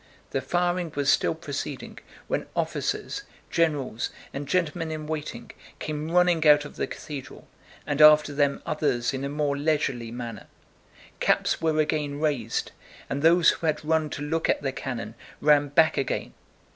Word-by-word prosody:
The 135 - -1
firing 175 +3 0
was 140 -1 +3
still - - +2
proceeding - - -6 0.3
when - - -2
officers, - - -2 0.3
generals, 145 -8 0 0.2
and 140 +1 -5
gentlemen 165 0 0
in 155 -1 -5
waiting 155 -1 -5 0.3
came 155 0 -4
running 175 -2 +3
out 150 0 +6
of - - -10
the - - -2
cathedral, 140 -4 -8 0.4
and 145 +1 0
after 150 -1 +7
them 140 -1 +1
others 140 -6 0
in 135 0 -3
a 140 - -2
more 145 -1 0
leisurely 140 -5 0
manner: 115 -3 -7 0.7
caps - - +2
were 160 -1 +1
again 150 -2 0
raised, 140 -8 -1 0.4
and 140 - -1
those 165 +2 +6
who 165 - -3
had 155 0 -1
run 160 -1 +1
to 145 - -5
look 160 +2 -1
at - - +1
the 135 - 0
cannon 120 -5 -5 0.3
ran 145 -1 +4
back 160 +3 +3
again. 135 - -2
150 Hz, 160 wpm, -26 LUFS, 140-160 Hz, 0.7 s, after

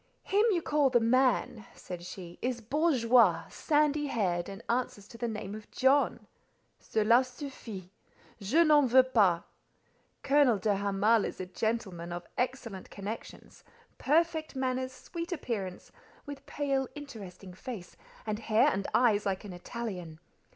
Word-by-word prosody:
"Him 405 +2 +2
you 350 -6 +1
call 295 -2 +3
the 245 -2 +4
man," 240 -2 +2
said 180 -2 -8
she, 180 -1 -9
"is 250 -1 -1
bourgeois, 240 - +3
sandy 295 -1 +1
haired, 180 -9 -1
and 195 +3 -9
answers 235 -4 -2
to 230 - -11
the 240 - -1
name 210 -3 -5
of 215 0 -9
John!—cela 255 -3 +1
suffit: 245 - -8 0.5
je 265 - +4
n'en 300 -4 +5
veux 255 +2 +7
pas. 200 -10 +3 0.8
Colonel 275 -5 +4
de 205 +2 +1
Hamal 200 +2 +2
is - - -5
a 185 - -3
gentleman 185 -3 -3
of 175 0 -5
excellent 245 -6 -3
connections, 205 +3 -8 0.4
perfect 315 +1 +1
manners, 260 0 -1
sweet 335 +7 -7
appearance, 210 - -4 0.3
with 285 -1 -9
pale 275 -2 -1
interesting 200 -10 -9
face, 200 -2 -8 0.3
and 215 -1 -2
hair 230 +5 +3
and 195 -7 -2
eyes 215 -5 +3
like 190 +1 -2
an 195 - -7
Italian. 180 -4 -6
230 Hz, 135 wpm, -30 LUFS, 195-270 Hz, 0.8 s, veux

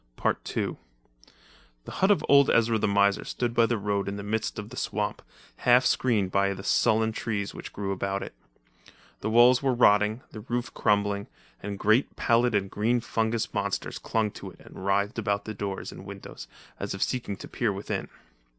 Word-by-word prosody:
II[edit] - - -2 1.1
The - - -8
hut 190 - +1
of 205 - +3
old 140 -1 +6
Ezra 115 -1 +3
the 110 - +1
miser 100 0 +3
stood 120 -1 -2
by 115 -1 +4
the 120 - 0
road 100 -1 -1
in 100 - -3
the 100 - -6
midst 110 +2 -2
of 105 0 -6
the - - -10
swamp, - - -2 0.4
half 125 +1 +4
screened 110 -9 +1
by 100 0 +1
the 95 - -9
sullen 110 +2 +2
trees 105 -3 -3
which - - -8
grew 100 -1 -4
about 95 +1 -2
it. - - -8 0.9
The 110 - -2
wall 120 +3 +7
were 135 -2 +1
rotting, 105 0 +4
the 110 - -8
roof 120 +2 -3
crumbling, 100 -1 +1 0.3
and 100 0 -5
great 110 +7 +2
pallid 120 -1 +2
and 100 -1 +1
green 115 +4 +1
fungus 115 0 -1
monsters 100 -1 -2
clung 110 -2 -1
to - - -9
it - - -17
and - - -11
writhed 100 +3 0
about 100 -2 -1
the 110 - -5
doors 100 -1 -5
and - - -10
windows, - - -9 0.3
as - - -3
if 95 - 0
seeking 115 -6 -3
to - - -9
peer 115 -4 -1
within. 100 +1 -4
105 Hz, 185 wpm, -27 LUFS, 100-115 Hz, 1.1 s, wall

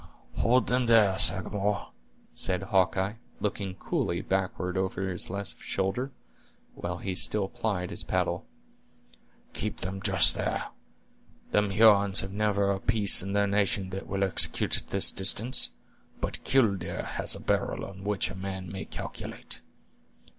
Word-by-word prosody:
"Hold 120 -1 +3
them 125 0 0
there, 110 -5 +5
Sagamore," 100 +1 +2 0.4
said 90 0 -1
Hawkeye, 95 +2 +1 0.2
looking 100 -2 -3
coolly 85 -2 -2
backward 95 -1 -2
over 95 0 -2
this 90 -2 -4
left 100 +1 -5
shoulder, 95 +8 -2 0.6
while 90 0 -5
he 95 +1 -4
still 95 +2 +2
plied 100 -5 -3
his - - -1
paddle; - - -1 1.1
"keep - - -4
them 95 +1 -4
just - - +6
there. - - -3 0.8
Them 105 -1 +2
Hurons 100 -1 +5
have 95 0 -7
never 100 -1 +1
a 95 - -2
piece 105 0 +4
in 100 +2 -4
their 100 0 +2
nation 100 -1 0
that 95 +1 -6
will 100 0 -1
execute 95 - +4
at - - -1
this 100 - +4
distance; 110 +6 +2 0.5
but - - -4
'killdeer' 100 -10 +1
has - - -1
a - - -8
barrel - - -1
on 95 0 -11
which 105 -1 -1
a - - -9
man 95 -1 -6
may 95 - -6
calculate." - - -6
100 Hz, 145 wpm, -28 LUFS, 95-105 Hz, 1.1 s, just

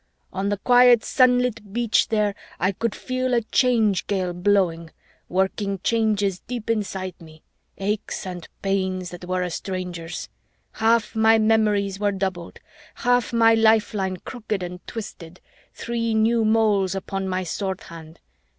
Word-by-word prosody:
On 195 +1 -1
the 205 - 0
quiet 245 +1 +5
sunlit 250 -5 +2
beach 235 -1 +2
there, 210 -2 +1 0.3
I 185 - +2
could 225 +3 -3
feel 255 -1 -1
a 235 - +1
Change 225 -5 +2
Gale 185 -3 -1
blowing, 180 -3 +1 0.4
working 195 +2 0
changes 210 -5 +1
deep 235 -2 -4
inside 190 -4 -3
me, 160 -1 -15 0.3
aches 200 +1 -3
and 180 -2 -7 0.2
pains 190 -2 -1
that 175 0 -9
were 185 0 -1
a 180 - -3
stranger's. 180 -2 -5 0.4
Half 225 0 +1
my 220 0 +5
memories 210 -3 +2
were 205 -1 +1
doubled, 190 -3 -4 0.4
half 245 -1 +1
my 225 -1 +5
lifeline 220 -4 +2
crooked 215 -2 -5
and 180 0 -6
twisted, 180 -6 -8 0.4
three 230 -1 -2
new 225 +1 +3
moles 210 -4 +2
upon 195 0 -4
my 185 0 -1
sword 190 +3 -3
hand. 165 -3 -12
205 Hz, 140 wpm, -23 LUFS, 185-225 Hz, 0.4 s, quiet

